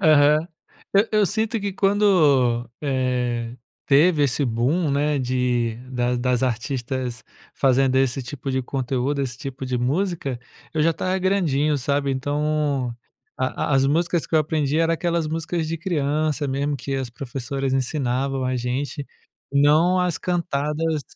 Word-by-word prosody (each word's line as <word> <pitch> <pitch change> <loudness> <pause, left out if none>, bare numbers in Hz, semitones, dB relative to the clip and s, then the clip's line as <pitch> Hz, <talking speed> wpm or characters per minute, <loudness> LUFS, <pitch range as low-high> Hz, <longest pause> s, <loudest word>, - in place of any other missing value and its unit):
Aham, 155 -2 +5 0.7
eu 215 -1 +4
sinto 220 +4 -1
que 200 0 -2
quando, 155 - +3
eh, 125 -3 -1 0.3
teve 150 +2 +4
esse 140 +1 0
boom, 135 +8 +1
né, 145 +1 +1
de 125 -3 0
das 125 -1 0
das 125 0 0
artistas 125 0 -2 0.3
fazendo 135 0 +3
esse 135 0 +1
tipo 135 +2 -6
de 130 0 0
conteúdo, 135 +2 -1
esse 125 -2 -4
tipo 135 -1 -6
de 125 -1 -1
música, 140 0 -1 0.3
eu 155 -2 +1
já 165 - +4
estava 185 +3 -1
grandinho 160 -6 +1
sabe, 140 +1 0
então, 145 -2 -1 0.4
a 130 +2 -1
as 135 0 +4
músicas 170 +3 +1
que - - -4
eu - - +6
aprendi 150 -1 0
eram 165 0 +3
aquelas 170 -1 -1
músicas 165 +1 -2
de 165 - -2
criança 155 -3 0
mesmo 140 +2 -1
que 135 +2 -4
as 135 -2 -2
professoras 135 +2 -4
ensinavam 135 0 -1
a 130 0 0
gente, 130 +3 -3 0.5
não 155 +6 +4
as 180 -2 0
cantadas 160 -2 -1
140 Hz, 140 wpm, -23 LUFS, 130-155 Hz, 0.7 s, eu